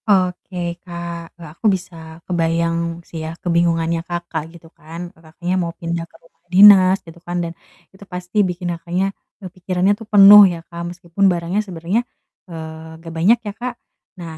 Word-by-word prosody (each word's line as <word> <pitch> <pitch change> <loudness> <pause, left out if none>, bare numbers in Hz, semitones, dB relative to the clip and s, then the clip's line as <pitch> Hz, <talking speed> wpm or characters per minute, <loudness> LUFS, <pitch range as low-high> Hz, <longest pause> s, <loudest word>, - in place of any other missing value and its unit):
Oke 180 -2 0
Kak, 170 -1 -7
eee, 165 -3 -10
aku 170 - -12
bisa 185 -3 -3 0.3
kebayang 170 0 -1
sih 165 - -7
ya, 160 +1 -7
kebingungannya 170 -1 +1
Kakak 175 -2 -4
gitu 170 -1 -15
kan, 170 +2 -9
Kakaknya 165 +2 -6
mau 170 -1 -3
pindah 170 -1 -4
ke - - -25
rumah 165 - -27
dinas 190 -1 +8
gitu 165 0 -13
kan, 175 +1 -5
dan 165 0 -5 0.4
itu 190 - -21
pasti 180 +2 -7
bikin 175 0 -3
Kakaknya, 180 +3 -2 0.3
eee, - - -6
pikirannya 185 +1 0
tuh 210 +1 -9
penuh 205 0 +10
ya 170 -2 -5
Kak, 170 0 -7
meskipun 175 +2 -2
barangnya 175 +3 -1
sebenernya, 185 +2 -2 0.5
eee, 160 -1 -9
gak 165 -1 -9
banyak 200 +9 +4
ya 205 - -4
Kak, 245 +3 -5 0.4
Nah, 165 -3 -8
175 Hz, 165 wpm, -19 LUFS, 165-185 Hz, 0.5 s, penuh